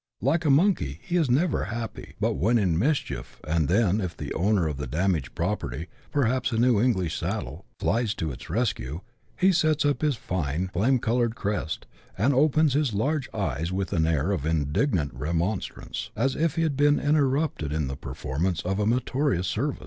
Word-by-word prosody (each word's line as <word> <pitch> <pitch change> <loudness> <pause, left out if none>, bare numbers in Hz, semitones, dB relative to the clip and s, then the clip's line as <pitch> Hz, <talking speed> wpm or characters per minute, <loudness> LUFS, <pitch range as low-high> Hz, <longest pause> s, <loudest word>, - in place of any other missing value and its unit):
Like 160 +6 +1
a - - +3
monkey, 140 - +2
he 175 - -3
is 160 -6 +2
never 150 +7 +2
happy 115 +1 -6
but - - +1
when 115 +6 +2
in 95 -7 +2
mischief, 130 - -1
and 80 -1 +1
then, 100 +2 +2
if 90 -3 -4
the - - -5
owner 95 -1 +2
of 75 -3 -3
the 70 -2 -4
damaged 80 0 -1
property, 85 -4 -2 0.2
perhaps 130 -2 +1
a 115 - -1
new 120 -3 +4
English 95 -10 +1
saddle, - - -4
flies 110 -1 +1
to 80 -2 -2
its - - -10
rescue, 90 - -1 0.4
he 190 +1 +4
sets 155 -4 +2
up 145 -1 +1
his 150 -3 +2
fine 90 -3 -2
flame 120 +9 +3
coloured 115 0 0
crest, 100 -7 -3 0.3
and 120 +9 +3
opens 150 +1 +3
his 140 -6 +1
large 140 +6 0
eyes 80 +8 -2
with 95 0 -2
an 80 -3 +2
air 80 +3 +1
of 90 -8 -1
indignant 80 - 0
remonstrance, 85 +6 -3
as 135 -1 +1
if 160 -2 0
he 165 - +1
had 155 -4 0
been 145 +1 +4
interrupted 145 - +1
in 75 -1 0
the 70 - -4
performance 85 +7 -3
pf 95 +3 -1
a 105 - +1
meritorious 125 - +1
service. 130 - -1
105 Hz, 185 wpm, -26 LUFS, 85-140 Hz, 0.4 s, new